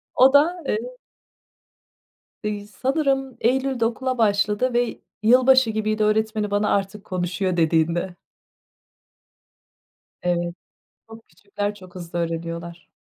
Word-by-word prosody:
O 265 Hz, +2 st, +6 dB
da, 335 Hz, +5 st, +4 dB
eee 215 Hz, -, 0 dB, 1.7 s
İii, 205 Hz, -1 st, -3 dB
sanırım 270 Hz, +2 st, -1 dB
Eylül'de 260 Hz, 0 st, +1 dB
okula 255 Hz, +2 st, -1 dB
başladı 210 Hz, +3 st, +2 dB
ve 240 Hz, -1 st, 0 dB, 0.2 s
yılbaşı 255 Hz, +1 st, +5 dB
gibiydi, 215 Hz, 0 st, -1 dB
öğretmeni 215 Hz, 0 st, 0 dB
bana 205 Hz, +1 st, +1 dB
artık 200 Hz, +1 st, -3 dB
konuşuyor 185 Hz, 0 st, -2 dB
dediğinde. 165 Hz, +2 st, +1 dB, 2.1 s
Evet, 175 Hz, -1 st, -1 dB, 0.5 s
çok 225 Hz, 0 st, -14 dB
küçükler 205 Hz, +1 st, -5 dB
çok 185 Hz, -3 st, -15 dB
hızlı 175 Hz, -1 st, -6 dB
öğreniyorlar. 170 Hz, 0 st, -5 dB
210 Hz, 100 wpm, -23 LUFS, 180-245 Hz, 2.1 s, O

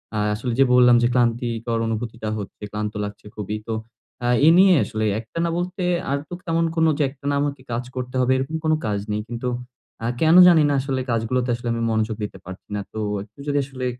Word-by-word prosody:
আ -, -, -1 dB, 0.2 s
আসলে 120 Hz, +3 st, -3 dB
যে -, -, +8 dB
বললাম 125 Hz, -1 st, +7 dB
যে -, -, +5 dB
ক্লান্তিকর 120 Hz, -1 st, 0 dB
অনুভূতিটা 110 Hz, 0 st, -4 dB
হচ্ছে, 100 Hz, +1 st, -9 dB
ক্লান্ত 105 Hz, 0 st, -3 dB
লাগছে 105 Hz, 0 st, -7 dB
খুবই। 105 Hz, 0 st, -4 dB
তো 115 Hz, -, -2 dB, 0.5 s
আ -, -, +2 dB, 0.2 s
এই 160 Hz, -, +8 dB
নিয়ে 190 Hz, 0 st, +7 dB
আসলে 110 Hz, 0 st, -2 dB
একটানা 165 Hz, +10 st, -3 dB
বলতে 180 Hz, +1 st, -3 dB, 0.3 s
আর 140 Hz, -, +2 dB
তো -, -, -9 dB
তেমন 165 Hz, 0 st, +1 dB
কোন 160 Hz, -1 st, +3 dB
যে 150 Hz, -, +2 dB
একটানা 140 Hz, +1 st, -4 dB
আমাকে 145 Hz, -2 st, -2 dB
কাজ 120 Hz, +1 st, -1 dB
করতে 125 Hz, 0 st, -5 dB
হবে 125 Hz, +1 st, +2 dB
এরকম 135 Hz, +4 st, -3 dB
কোন 155 Hz, -, +3 dB
কাজ 105 Hz, -2 st, 0 dB
নেই। 105 Hz, 0 st, -1 dB
কিন্তু 120 Hz, +1 st, -4 dB, 0.6 s
আ -, -, 0 dB
কেন 160 Hz, +1 st, +5 dB
জানি 170 Hz, -3 st, +6 dB
না -, -, +2 dB
আসলে 135 Hz, -1 st, -2 dB
কাজগুলোতে 120 Hz, +2 st, 0 dB
আসলে 120 Hz, +1 st, -7 dB
আমি 115 Hz, -, -2 dB
মনোযোগ 110 Hz, 0 st, 0 dB
দিতে 105 Hz, -, -5 dB
পারছি 90 Hz, +1 st, -10 dB
না। -, -, -1 dB
তো -, -, -7 dB, 0.3 s
একটু 105 Hz, +5 st, -21 dB
যদি 145 Hz, 0 st, +1 dB
আসলে 130 Hz, -2 st, -6 dB
120 Hz, 210 wpm, -22 LUFS, 110-140 Hz, 0.6 s, যে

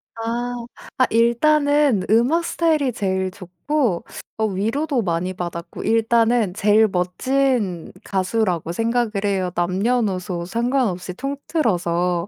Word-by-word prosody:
아. 235 Hz, +1 st, -3 dB, 0.3 s
아 255 Hz, -, +5 dB
일단은 285 Hz, 0 st, +3 dB
음악 245 Hz, +10 st, +3 dB
스타일이 310 Hz, -6 st, +1 dB
제일 190 Hz, -4 st, -1 dB
좋고 185 Hz, -, -2 dB, 0.3 s
어 220 Hz, -, +1 dB
위로도 230 Hz, +8 st, -1 dB
많이 180 Hz, -1 st, -1 dB
받았고 175 Hz, -2 st, -6 dB
일단은 225 Hz, -2 st, +2 dB
제일 210 Hz, +2 st, +4 dB
멋진 200 Hz, +1 st, 0 dB
가수라고 185 Hz, -3 st, -1 dB
생각을 230 Hz, +4 st, 0 dB
해요 190 Hz, -3 st, 0 dB
남녀노소 185 Hz, -1 st, 0 dB
상관없이 230 Hz, -5 st, -1 dB
통틀어서. 180 Hz, -, -1 dB
220 Hz, 255 characters per minute, -21 LUFS, 185-245 Hz, 0.3 s, 아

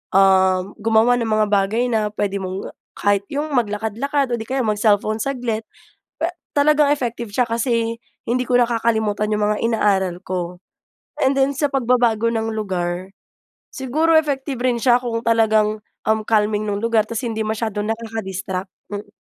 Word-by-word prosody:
um, 190 Hz, -1 st, +5 dB, 0.2 s
gumawa 225 Hz, +2 st, +3 dB
ng 230 Hz, -, -1 dB
mga 215 Hz, -1 st, +2 dB
bagay 205 Hz, +4 st, +2 dB
na 215 Hz, -2 st, +1 dB
puwede 205 Hz, -1 st, -2 dB
mong 190 Hz, 0 st, -5 dB, 0.2 s
kahit 200 Hz, -1 st, +1 dB
‘yong 295 Hz, +2 st, -3 dB
maglakad-lakad 240 Hz, +3 st, -1 dB
o 235 Hz, -, 0 dB
‘di 220 Hz, -, -7 dB
kaya 265 Hz, 0 st, 0 dB
mag-cellphone 215 Hz, 0 st, +1 dB
saglit. 230 Hz, -3 st, -2 dB, 0.5 s
Puwe 330 Hz, -, +1 dB, 0.2 s
talagang 295 Hz, 0 st, +4 dB
effective 240 Hz, -6 st, -2 dB
siya 245 Hz, +3 st, +1 dB
kasi 230 Hz, 0 st, 0 dB, 0.3 s
hindi 250 Hz, +2 st, +1 dB
ko 245 Hz, -1 st, +2 dB
nakakalimutan 220 Hz, -3 st, +1 dB
‘yong 210 Hz, 0 st, +1 dB
mga 210 Hz, 0 st, +1 dB
inaaral 190 Hz, -5 st, +1 dB
ko. 180 Hz, -1 st, -4 dB, 0.6 s
And 270 Hz, +1 st, +2 dB
then, 270 Hz, +1 st, +3 dB
sa 290 Hz, +1 st, 0 dB
pagbabago 240 Hz, -4 st, +2 dB
ng 225 Hz, -1 st, -1 dB
lugar, 185 Hz, -2 st, -3 dB, 0.6 s
siguro 300 Hz, +6 st, +1 dB
effective 285 Hz, -4 st, +1 dB
rin 250 Hz, -1 st, +1 dB
siya 240 Hz, +1 st, +3 dB
kung 235 Hz, -2 st, -3 dB
talagang, 220 Hz, -2 st, +2 dB, 0.2 s
um, 220 Hz, 0 st, +2 dB
calming 215 Hz, -1 st, +1 dB
nung 205 Hz, +2 st, -2 dB
lugar 225 Hz, -2 st, +2 dB
tapos 230 Hz, +2 st, -3 dB
hindi 225 Hz, -2 st, -3 dB
masyadong 215 Hz, -1 st, -2 dB
nakaka-distract. 195 Hz, -4 st, -5 dB, 0.2 s
Mm. 205 Hz, 0 st, -5 dB
225 Hz, 155 wpm, -21 LUFS, 205-245 Hz, 0.6 s, um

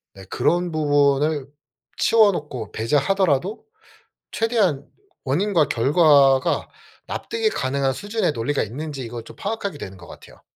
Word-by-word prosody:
네. 95 Hz, -, -11 dB
그런 175 Hz, 0 st, 0 dB
부분을 145 Hz, -1 st, +2 dB, 0.5 s
치워놓고 150 Hz, -, +2 dB
배제하더라도 160 Hz, -, 0 dB, 0.7 s
최대한 200 Hz, -, 0 dB, 0.4 s
원인과 165 Hz, +3 st, +1 dB
결과가 140 Hz, 0 st, +3 dB, 0.4 s
납득이 450 Hz, -1 st, -2 dB
가능한 135 Hz, -, -1 dB
수준의 205 Hz, -, -1 dB
논리가 140 Hz, +4 st, -1 dB
있는지 140 Hz, +5 st, -6 dB
이걸 120 Hz, -1 st, -7 dB
좀 -, -, -13 dB
파악하게 200 Hz, -6 st, -4 dB
되는 95 Hz, -7 st, -8 dB
것 85 Hz, -2 st, -14 dB
같아요. -, -, -15 dB
145 Hz, 300 characters per minute, -22 LUFS, 135-195 Hz, 0.7 s, 결과가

